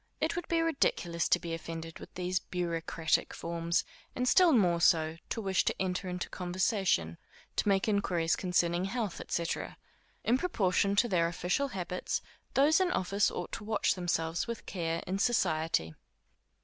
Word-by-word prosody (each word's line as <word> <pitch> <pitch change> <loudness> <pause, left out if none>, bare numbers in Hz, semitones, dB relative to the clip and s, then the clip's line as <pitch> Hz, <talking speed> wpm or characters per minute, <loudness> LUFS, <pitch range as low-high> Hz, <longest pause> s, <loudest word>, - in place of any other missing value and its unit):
It - - 0
would 350 -1 -4
be 335 -1 +2
ridiculous 175 - 0
to - - +5
be 170 -1 -5
offended 165 0 -6
with - - -11
these 180 0 0
bureaucratic 165 -2 -1
forms, 170 0 -1 0.3
and 250 0 0
still 360 +4 +6
more 180 - +3
so, 160 -2 +3
to 225 - -2
wish 190 -3 +1
to - - -1
enter 185 0 -1
into 180 0 -3
conversation, 180 - 0 0.4
to - - +1
make 195 +1 +2
inquiries 175 -6 +1
concerning 175 -1 +1
the 190 - -1
health, 220 -5 -3
&c. 170 - 0 0.8
In 245 +3 +2
proportion 200 - +1
to 235 +4 +4
their 175 -6 +2
official 180 +10 0
habits, 180 -6 -3 0.3
those 295 +5 +5
in 375 -1 +2
office 195 - +1
ought - - -5
to - - -5
watch 215 0 +1
themselves 170 -1 -1
with 235 -1 -5
care 165 -3 -2
in 190 +2 -2
society. 160 - +1
180 Hz, 160 wpm, -31 LUFS, 170-210 Hz, 0.8 s, still